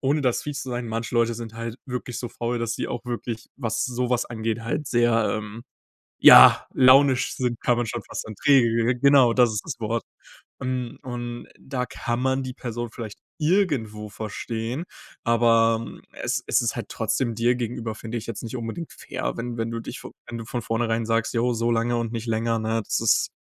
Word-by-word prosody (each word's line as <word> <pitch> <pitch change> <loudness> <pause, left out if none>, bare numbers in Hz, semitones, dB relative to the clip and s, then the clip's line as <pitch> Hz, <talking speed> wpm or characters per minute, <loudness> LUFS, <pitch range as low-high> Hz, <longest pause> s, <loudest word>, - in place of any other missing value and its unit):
ohne 140 +3 +1
das 125 -2 +1
fies 145 -3 -4
zu 130 - -6
sein, 120 -1 -3
manche 115 +2 -3
Leute 115 0 +2
sind 115 -1 -7
halt 115 0 -5
wirklich 125 -1 -4
so 120 - -4
faul, 120 +1 -3
dass 115 -1 -2
sie - - -3
auch 120 +1 -5
wirklich, 120 -2 -5
was 115 -5 -1
sowas 125 -1 0
angeht 115 -1 -2
halt 140 +5 -2
sehr, 120 -2 +2
ähm, 110 +2 -8 0.6
ja, - - +9
launisch 130 0 +5
sind, 125 -2 -1
kann 120 - +2
man 120 -1 0
schon 115 0 -4
fast - - -4
sagen. 110 - -8
Träge. 120 -3 +3
Genau, 140 -3 +6
das 120 -2 +4
ist 105 - -2
das - - -5
Wort. 115 +1 -1 0.6
Und 125 -2 -3
und 120 -1 -5
da 125 -2 -3
kann 120 +1 -3
man 130 +1 +1
die 130 - -4
Person 120 -1 -5
vielleicht 110 -4 -7 0.2
irgendwo 145 - 0
verstehen, 115 - -4 0.4
aber 115 -1 +3 0.4
es - - -1
es - - +3
ist - - 0
halt - - -5
trotzdem 120 -3 -1
dir 120 +2 +3
gegenüber, 115 -2 -3
finde 115 +1 -5
ich - - -8
jetzt 115 -3 -5
nicht 115 +2 -5
unbedingt 115 +8 -5
fair, - - -4
wenn 120 0 -4
wenn 115 0 -1
du 115 - -3
dich - - -7
vo - - -9 0.2
wenn 120 - -5
du 115 - -6
von 120 -1 -3
vornherein 115 0 -1
sagst: 115 0 0
„Jo, 120 +1 +2
so 115 +1 0
lange 115 +1 +1
und 115 -1 -2
nicht 115 0 -4
länger“, 115 0 0
ne, 110 +1 -1
das - - 0
ist - - +3
120 Hz, 200 wpm, -24 LUFS, 115-125 Hz, 0.6 s, ja